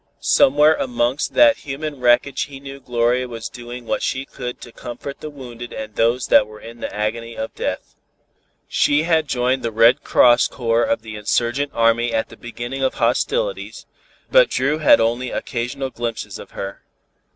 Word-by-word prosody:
Somewhere 150 +3 +5
amongst 125 +2 -1
that 290 -1 +6
human 145 +1 -6
wreckage 125 +2 +2
he 140 -1 -11
knew 135 0 -9
Gloria 125 0 0
was 115 -1 -6
doing 120 0 -9
what - - -1
she 130 +1 -2
could 125 -2 -7
to 120 - -10
comfort 125 +4 -8
the 155 - -7
wounded 120 -4 -9
and 110 0 -7
those 120 +3 +1
that 105 - +5
were 110 0 -12
in 115 +1 -11
the - - -5
agony 115 +2 -3
of 110 - -4
death. - - -4 0.7
She 145 +2 +2
had 160 -2 +2
joined 130 0 0
the 115 - -2
Red 115 +6 +4
Cross 120 -1 +5
Corps 115 -2 0
of 115 -1 0
the 110 -1 -8
insurgent 120 +6 0
army 115 +1 +2
at 110 - -1
the - - -12
beginning 120 +3 -6
of 130 - 0
hostilities, - - -1 0.5
but - - +6
Dru 150 +4 0
had 155 - 0
had - - +6
only 120 +2 0
occasional 130 +3 -4
glimpses 120 -2 -5
of - - -11
her. 100 0 -7
125 Hz, 175 wpm, -20 LUFS, 115-140 Hz, 0.7 s, that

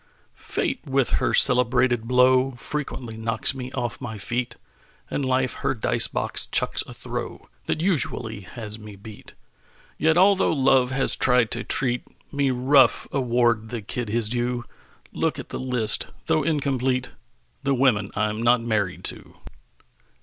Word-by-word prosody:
Fate 265 - -3
with 135 -2 +1
her - - +1
celebrated 125 -2 +3
blow 130 +1 +4
Frequently 125 -3 -6
knocks 115 +3 0
me 130 -1 -7
off 120 -1 -4
my 110 -5 -6
feet; 120 +4 -3 0.6
And 140 - -2
Life 130 -1 0
her 135 - 0
dice 110 - +3
box - - 0
chucks - - +2
a - - -9
throw - - -6 0.2
That 155 - -1
usually 130 - -1
has 105 +2 -7
me 105 -1 -11
beat. 105 +1 -13 0.6
Yet 160 +1 +3
although 195 0 +4
Love 130 -3 +3
has 135 +1 +2
tried 125 -4 +2
to - - -3
treat 125 -2 -1 0.3
Me 140 -1 +1
rough, 130 0 +3
award 120 -4 +1
the 115 -3 -5
kid 115 +3 -5
his 115 0 +2
due. 120 +1 -2 0.5
Look - - -1
at - - -8
the - - -5
list, 125 -4 +1 0.2
though 155 - +2
incomplete: 135 -4 -1 0.5
The 140 -1 0
women 115 -6 +2
I'm 105 +1 -1
not 120 +1 +4
married 105 -5 -1
to. - - -5
125 Hz, 150 wpm, -24 LUFS, 115-135 Hz, 0.6 s, blow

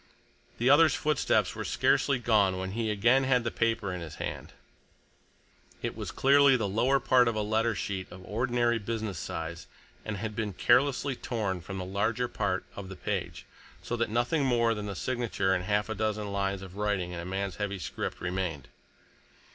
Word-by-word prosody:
The 120 - 0
other's 145 +2 +6
footsteps 150 0 +1
were - - -5
scarcely 140 -2 +2
gone 105 -6 +2
when 95 0 -4
he 110 +1 -1
again 120 +6 +3
had 130 -2 +2
the 115 - -2
paper 115 -4 0
in 90 - -5
his 80 -3 -7
hand. - - -5 1.3
It - - -2
was - - -5
clearly 140 -1 +5
the 110 -4 -1
lower 120 +7 +2
part 125 -1 +4
of 115 - 0
a 105 - 0
letter 110 +2 +1
sheet 95 -2 -3
of 90 0 -11
ordinary 120 +1 +1
business 110 -3 -3
size 85 +1 -5 0.4
and 110 -2 -4
had 110 +1 -4
been 105 -2 -2
carelessly 135 +6 +2
torn 105 -8 -3
from 95 +3 -7
the 90 - -4
larger 110 +6 0
part - - -2
of 100 -2 -7
the 95 - -7
page, - - -4 0.4
so 120 - -2
that 115 -2 0
nothing 120 +7 +1
more 120 -3 +3
than 105 -1 -5
the 100 - -4
signature 115 -5 0
and 90 -1 -1
half 105 +1 +1
a 110 - -2
dozen 105 -1 -2
lines 100 -1 -1
of 95 0 -10
writing 100 -4 -1
in 90 - -5
a - - -5
man's 95 +1 -3
heavy 100 -1 -2
script 90 - -5
remained. 90 -6 -3
105 Hz, 185 wpm, -29 LUFS, 95-120 Hz, 1.3 s, other's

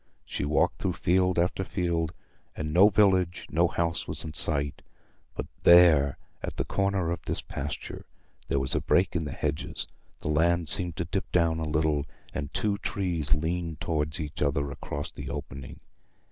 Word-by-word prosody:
She - - -3
walked 75 +1 +2
through 95 -2 0
field 90 +1 +2
after 90 +2 +1
field, 85 -4 -1 0.4
and 75 -1 -3
no 95 +5 +7
village, 95 -4 +3
no 85 +3 +4
house 85 0 -1
was - - -2
in 80 - -6
sight; 70 -1 0 0.5
but - - -3 0.2
there, 80 -5 +7 0.2
at - - -5
the - - -1
corner 100 -3 0
of 85 - -3
this - - -2
pasture, 70 +1 -6 0.4
there - - 0
was 65 -2 0
a - - +1
break 90 +1 +2
in 80 -2 0
the 75 - -4
hedges; 75 0 -3 0.3
the - - -6
land 85 +1 +2
seemed 85 0 +2
to 85 - -2
dip 95 +4 -3
down 85 -2 +2
a 80 - -2
little, 75 -1 +1 0.3
and 70 -2 -4
two 100 -1 0
trees 85 -10 0
leaned 80 0 -2
towards 75 -1 -1
each 75 -2 -5
other 70 -1 +1
across 70 +1 -5
the - - -7
opening. 65 0 -7
80 Hz, 175 wpm, -28 LUFS, 75-90 Hz, 0.5 s, no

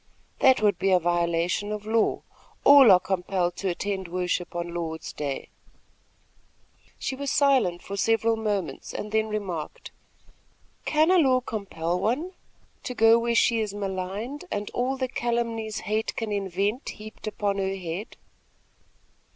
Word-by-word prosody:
"That 260 -5 +5
would 205 -1 +3
be 195 - +1
a 185 - +6
violation 175 +3 0
of 210 0 -5
law. 220 0 +1 0.4
All 275 -6 +9
are 185 - +7
compelled 180 -1 -1
to 195 - -1
attend 190 +1 -3
worship 180 0 -2
on 175 0 -3
Lord's 160 -2 -5
day." 140 -2 -4 1.5
She 265 - -3
was 280 +1 -3
silent 255 -13 +2
for 200 - -6
several 225 +2 +2
moments 205 -9 -3
and 210 - -5
then 220 0 +1
remarked: 190 -8 -5 0.9
"Can 315 +3 +3
a 370 - +6
law 260 -5 +4
compel 185 -7 -3
one 260 - -1 0.5
to 250 - -5
go 225 +1 +6
where 235 0 0
she 230 0 +3
is 210 -2 -2
maligned 200 - -4
and 205 -5 -3
all 255 +2 -1
the 260 -1 -1
calumnies 230 -3 -2
hate 215 +1 -2
can 225 -2 -3
invent 200 - -1
heaped 215 0 -9
upon 205 -1 -1
her 195 0 -1
head?" 185 +4 -6
205 Hz, 145 wpm, -26 LUFS, 180-230 Hz, 1.5 s, All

